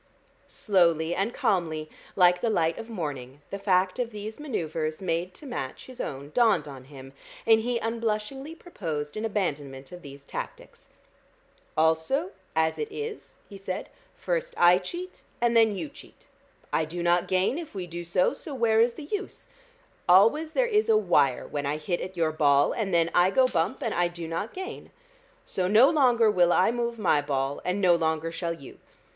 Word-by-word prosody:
Slowly 170 -5 +2
and 195 +6 -1
calmly, 160 -8 -1 0.3
like 180 -1 +5
the 235 - +1
light 165 -6 +1
of 225 - -8
morning, 145 - -6
the 200 - -4
fact 185 +1 +1
of 245 -2 -1
these 215 +1 -7
manoeuvres 160 - -3
made 175 0 -2
to 300 - -12
match 135 - -5
his 255 -1 -8
own 140 +1 -6
dawned 225 -7 +3
on 135 -3 -10
him, 135 -1 -12 0.3
and 225 -1 +5
he 240 +1 -1
unblushingly 230 +6 -3
proposed 160 - -5
an 215 +1 -3
abandonment 145 -10 -3
of 180 0 -10
these 140 -2 -11
tactics. - - -8 0.9
"Also, 160 - +1 0.2
as 160 0 +1
it 150 - -2
is," 440 0 -7
he 200 -2 -11
said, 190 -1 -5 0.3
"first - - -2
I 175 +1 +6
cheat, 350 - -7 0.2
and 240 -1 +2
then 220 -3 +4
you 165 -4 -4
cheat. - - -16 0.5
I 160 - +2
do 170 +3 -5
not 175 0 +2
gain 190 - +1
if 325 -10 -9
we 185 -2 -4
do 175 0 -6
so, 175 +2 +1
so 290 - -8
where 225 -3 +3
is 235 0 +2
the 310 - -8
use? 405 +7 -6 0.6
Always 230 - +5
there - - +3
is 430 -2 +1
a 220 - +6
wire 150 -10 +2
when 145 -1 -3
I 145 +2 -1
hit 175 +3 -2
at 185 0 -7
your 160 -2 +2
ball, 145 -2 +3
and 215 -5 -2
then 170 -1 +2
I 175 +1 +5
go 260 +6 +4
bump, 205 - -1
and 230 - -1
I 175 0 +2
do 175 -1 -7
not 165 +7 -3
gain. 375 0 -7 0.6
So 185 -1 -1
no 220 +8 +6
longer 245 -7 +4
will 175 -3 +4
I 185 +5 +4
move 235 -1 -2
my 175 -8 +2
ball, 140 -1 -2
and 180 +2 -1
no 180 -3 +5
longer 160 -1 0
shall 170 0 -3
you. 140 -5 -13
185 Hz, 185 wpm, -27 LUFS, 160-230 Hz, 0.9 s, I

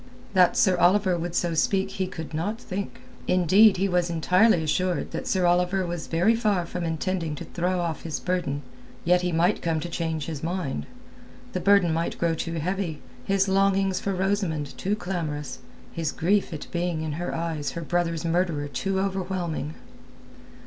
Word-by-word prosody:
That 180 -2 +5
Sir 185 -2 +4
Oliver 185 +1 +4
would 170 0 -4
so 175 -1 +1
speak 195 +4 +1
he 190 -1 -2
could 160 -4 -7
not 205 +9 -2
think. 200 +2 -5 0.3
Indeed, 185 +4 +5
he 195 +2 +1
was 180 -2 +1
entirely 180 +3 +3
assured 180 +3 0
that - - -4
Sir 185 -2 +2
Oliver 180 +2 +2
was 175 -1 -4
very 175 +7 +3
far 210 -6 +1
from 180 +1 -4
intending 165 -1 -2
to - - -7
throw 180 +1 -1
off 165 -4 -2
his 160 -2 -4
burden. 170 -6 -2 0.4
Yet 180 +1 +4
he 180 0 -1
might 170 +5 +2
come 165 -2 0
to 175 - -5
change 160 -3 -2
his 155 -4 -5
mind. 170 -4 -3 0.7
The 185 - -1
burden 180 -2 +4
might 165 +1 -1
grow 170 -1 +1
too 165 +1 -3
heavy, 170 -1 -2 0.3
his 195 0 +2
longings 195 0 +2
for 195 -1 -2
Rosamund 185 -6 -1
too 200 +2 -1
clamorous, 165 -7 -4 0.3
his 165 -2 -2
grief 195 +5 +1
at 155 - -6
being 170 -2 -1
in 155 - -3
her 170 +4 -3
eyes 165 -3 -3
her 170 - -4
brother's 170 -1 -1
murderer 165 -3 0
too 190 +7 -2
overwhelming. 185 -6 -2
175 Hz, 175 wpm, -26 LUFS, 165-190 Hz, 0.7 s, That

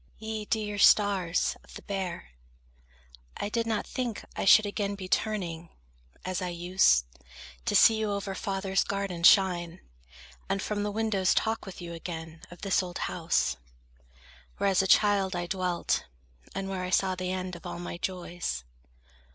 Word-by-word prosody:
Ye 220 -1 -5
dear 210 -2 -2
stars 195 -5 +4
of - - -15
the - - -9
Bear, 190 - -4 1.1
I 205 - -3
did 230 +1 -1
not 220 -2 -1
think 245 -4 -4
I - - -2
should 215 +2 +7
again 200 0 -2
be 190 -2 -7
turning, 175 -6 -1 0.6
as 185 +1 -2
I 180 - -2
used, 175 - +3 0.6
To - - 0
see 225 - +7
you 215 -1 -1
over 200 -1 -3
father's 195 0 -1
garden 195 -3 -3
shine, 175 -1 +4 0.7
And 195 0 0
from 210 +1 -2
the 205 - -1
windows 205 -3 +1
talk 220 -1 0
with 185 - -8
you 170 0 -6
again 160 -1 -7
Of 175 - -13
this 195 -1 +2
old 180 -1 -6
house, 165 - 0 1.0
where 200 - +2
as 190 - +4
a 190 - -1
child 200 -2 +4
I 175 0 -2
dwelt, 180 -1 -1 0.5
And 195 0 -3
where 190 -1 -3
I 180 - -3
saw 190 0 +2
the 185 0 -3
end 185 -1 -3
of 170 - -9
all - - -5
my 175 0 -6
joys. 175 - -4
190 Hz, 165 wpm, -28 LUFS, 175-205 Hz, 1.1 s, should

